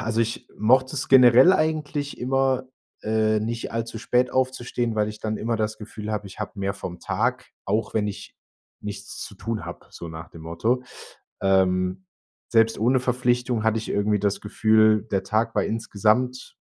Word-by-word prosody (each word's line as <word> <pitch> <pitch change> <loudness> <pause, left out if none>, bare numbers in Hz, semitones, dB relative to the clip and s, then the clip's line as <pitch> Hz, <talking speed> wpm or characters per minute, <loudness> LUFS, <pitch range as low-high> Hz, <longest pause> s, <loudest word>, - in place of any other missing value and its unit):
also, 115 +1 -1
ich 115 +2 -2
mochte 130 +6 +3
es 135 - -3
generell 130 +5 +8
eigentlich 150 -3 -1
immer, 130 0 +1 0.4
äh, 110 0 +1
nicht 115 +1 -4
allzu 115 0 -3
spät 125 +2 +1
aufzustehen, 125 -2 -1
weil 105 -1 +1
ich 105 0 -8
dann 110 -1 -2
immer 115 +1 -1
das 110 0 -2
Gefühl 110 0 -6
habe, 105 -1 -3
ich 95 - -12
habe 100 - -5
mehr 100 0 -1
vom 90 -1 -7
Tag, - - -1
auch 105 +3 -1
wenn 105 -2 +1
ich 100 - -8 0.4
nichts 100 -1 -7
zu 105 - -7
tun 115 +2 -4
habe, - - -9
so 85 - -8
nach 80 0 -8
dem 80 - -12
Motto. 110 +10 -1 0.6
Ähm, 95 -1 +1 0.4
selbst 115 -1 +3
ohne 125 +4 +3
Verpflichtung 125 -2 0
hatte 110 0 +2
ich 110 - -6
irgendwie 105 0 +1
das 100 0 -1
Gefühl, 110 0 +3
der 95 - +1
Tag 115 +2 0
war - - +2
insgesamt 115 +3 0
110 Hz, 175 wpm, -24 LUFS, 105-125 Hz, 0.6 s, generell